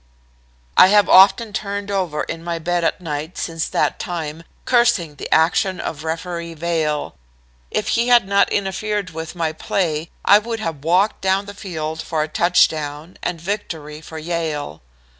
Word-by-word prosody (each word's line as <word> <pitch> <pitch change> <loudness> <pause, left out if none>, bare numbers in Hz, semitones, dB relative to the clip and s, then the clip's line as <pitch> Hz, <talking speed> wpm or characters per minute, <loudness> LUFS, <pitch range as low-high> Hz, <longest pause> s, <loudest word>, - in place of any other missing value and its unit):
I - - +9
have 205 +1 +5
often 205 +3 +6
turned 200 0 -3
over 180 -6 -1
in 165 0 -6
my 170 0 -2
bed 175 +1 -1
at 165 - 0
night 155 +1 -5
since 165 -1 -2
that - - 0
time, 165 -5 -4 0.2
cursing 235 -10 +2
the - - -8
action 175 +3 +3
of 150 -1 -5
Referee 170 +1 -4
Vail. 155 -2 -1 0.6
If 215 - -2
he 235 +1 +2
had 240 -5 +5
not 200 0 +3
interfered 200 0 -2
with 160 +1 -7
my 165 -2 -1
play 160 -1 -2 0.2
I 205 - +7
would 225 +1 -4
have 160 -9 -4
walked 185 +6 +2
down 190 +1 +1
the 200 - -8
field 160 -5 -5
for 155 -2 -1
a - - -4
touchdown 155 -1 +1
and 175 -2 -3
victory 160 -5 -5
for 160 0 -9
Yale. 155 - -3
170 Hz, 160 wpm, -20 LUFS, 160-200 Hz, 0.6 s, I